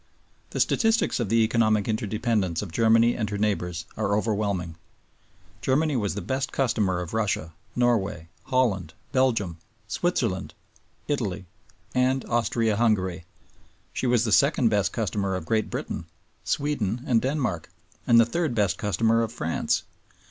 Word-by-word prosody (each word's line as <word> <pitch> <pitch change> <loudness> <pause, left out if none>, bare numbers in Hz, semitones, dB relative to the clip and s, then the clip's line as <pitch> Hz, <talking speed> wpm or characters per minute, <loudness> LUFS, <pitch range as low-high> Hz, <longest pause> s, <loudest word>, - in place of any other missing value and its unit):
The - - -4
statistics 225 -7 +2
of 115 -5 -1
the 115 +1 +4
economic 110 -2 +2
interdependence 110 -4 -1
of 95 - -7
Germany 115 +4 +4
and 105 -3 -2
her 105 - -3
neighbors 90 -5 -1
are 100 +1 +1
overwhelming. 100 -6 -1 0.9
Germany 150 +2 +1
was 105 -5 -1
the 105 - -4
best 130 +7 -2
customer 110 -9 +1
of 85 +2 -7
Russia, 100 -7 -1 0.2
Norway, 110 -9 +1 0.2
Holland, 100 -11 0 0.2
Belgium, 115 -10 +1 0.3
Switzerland, 115 - -1 0.5
Italy, 105 -10 -2 0.5
and 130 +1 +1
Austria 115 -2 +1
Hungary; 95 -7 +1 0.7
she 130 - -1
was 120 -2 +3
the 110 - -1
second 140 0 +4
best 105 -2 +1
customer 100 -3 -1
of 90 - -5
Great 110 +5 0
Britain, - - -5 0.4
Sweden, 125 -6 -1
and 115 -3 +3
Denmark; 130 - -2 0.4
and 115 -1 +7
the 115 - +6
third 155 +1 -1
best 100 -6 +1
customer 115 +2 +2
of 115 -1 -2
France. 85 -8 -1
110 Hz, 140 wpm, -26 LUFS, 100-120 Hz, 0.9 s, and